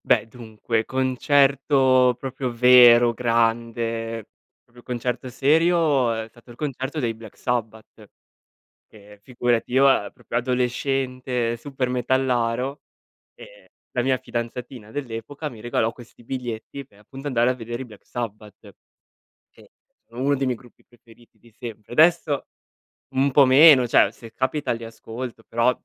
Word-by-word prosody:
Beh, - - +3
dunque, 115 -1 -3
concerto 130 0 +2
proprio 130 -1 -4
vero, 120 -1 +7
grande, 115 -1 -1 0.3
proprio 120 0 -19
concerto 125 +1 -4
serio, 150 -1 +2
è 110 -1 -4
stato 120 +2 -21
il 120 - -12
concerto 140 +1 -4
dei 120 -5 -1
Black 110 -2 -14
Sabbath. 110 -3 -4 0.8
Che 105 -1 -17
figurati 120 0 -1
io 135 +2 +5
a 105 -6 +2
proprio - - -7
adolescente, 125 -1 -1
supermetallaro 125 0 -1 0.5
e - - -16 0.2
la 125 - -1
mia 130 +1 +2
fidanzatina 120 -2 -6
dell'epoca 140 +3 -6
mi 115 - -12
regalò 115 -1 -1
questi 120 0 -16
biglietti, 125 +2 -6
pe' 105 - -25
appunto 135 +7 -12
andare 125 -3 +2
a - - 0
vedere 120 +1 -6
i - - -7
Black 110 -4 -16
Sabbath. 105 -3 -8 0.8
Che - - -21 0.4
sono 115 +2 -10
uno 140 +1 +2
dei 135 - -1
miei 125 -3 -1
gruppi 120 0 -21
preferiti 120 -1 -22
di 120 - -21
sempre. 110 -2 -10
Adesso 155 0 +3 0.7
un 135 +1 +2
po' 140 +1 +6
meno, 130 -1 +7
cioè - - +4
se 115 -1 -14
capita 130 +2 -1
li 115 0 -7
ascolto, 115 +1 -8
però, 115 +2 +2
125 Hz, 135 wpm, -23 LUFS, 115-130 Hz, 0.8 s, vero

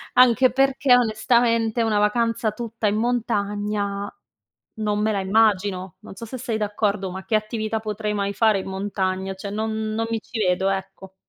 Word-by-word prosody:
anche 250 0 +6
perché, 270 0 +3
onestamente, 230 0 +2
una 215 -2 +2
vacanza 225 +1 +1
tutta 230 0 -3
in 205 +1 +1
montagna 205 -3 -1 0.7
non 210 -1 0
me 215 +1 +1
la 200 -2 0
immagino. 190 -3 +1
Non - - -11
so 230 - -7
se 245 +4 -7
sei 230 -2 -2
d'accordo, 205 -2 -1
ma 190 +1 -7
che 215 - -2
attività 215 0 -1
potrei 215 -1 -3
mai 200 -1 -1
fare 215 -2 +3
in - - -8
montagna? 190 -1 -2
Cioè, 195 +1 -7
non 220 +2 -2 0.2
non 225 +1 -1
mi 225 -1 -1
ci 225 - -7
vedo, 190 -1 +1
ecco. 190 0 -5
215 Hz, 170 wpm, -23 LUFS, 200-225 Hz, 0.7 s, anche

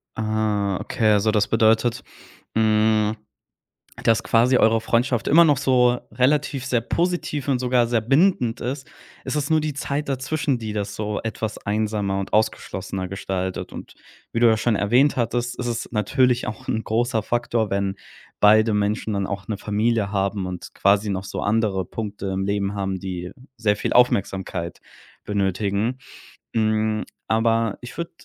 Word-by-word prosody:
Ah, 110 -3 0
okay. 110 -2 +1
Also, 105 +1 +2
das 105 -1 +2
bedeutet, 115 +1 +2 0.5
hm, 110 -1 +3 0.9
dass 115 -1 +3
quasi 120 +3 +3
eure 115 -1 +3
Freundschaft 120 +1 0
immer 170 +4 +7
noch 145 -4 +3
so 125 -2 +3
relativ 135 +2 +1
sehr 125 -3 +1
positiv 170 0 -1
und 135 -3 +1
sogar 125 -1 +2
sehr 115 -1 +1
bindend 135 - +2
ist 130 +2 -4 0.4
ist - - -3
es 145 +1 -2
nur 160 -1 +3
die 150 -1 -2
Zeit 145 +1 -3
dazwischen, 135 0 -1
die 110 -2 -5
das 100 -1 -3
so 105 -1 -3
etwas 110 -1 -4
einsamer 105 -2 -1
und 100 - -6
ausgeschlossener 95 -3 -1
gestaltet, 95 -1 -4
und - - -10 0.4
wie 115 - 0
du 120 - +7
ja 110 -1 +4
schon 115 0 +1
erwähnt 120 +8 +3
hattest, 120 +1 -1
ist 125 - -2
es 115 -1 -3
natürlich 125 +4 +2
auch 110 - -7
'n 110 - -1
großer 115 +1 0
Faktor, 120 -2 0
wenn 100 0 -1 0.5
beide 110 +1 +5
Menschen 105 +1 0
dann 100 -1 -1
auch 100 -1 -5
'ne 110 - -3
Familie 105 0 0
haben 100 -1 -1
und 90 -1 -7
quasi 100 +1 +2
noch 95 -1 -2
so 100 - -6
andere 100 -3 0
Punkte 100 0 -5
im 95 0 -2
Leben 100 0 -1
haben, 95 -2 -2
die 90 -1 -5 0.3
sehr 105 -2 +1
viel - - -2
Aufmerksamkeit 95 -7 +1 0.4
benötigen. 100 +4 -1 0.5
Hm, 110 -1 +1 0.2
aber 115 -1 +1
ich 125 - -10
würde 170 0 -4
110 Hz, 160 wpm, -23 LUFS, 100-120 Hz, 0.9 s, immer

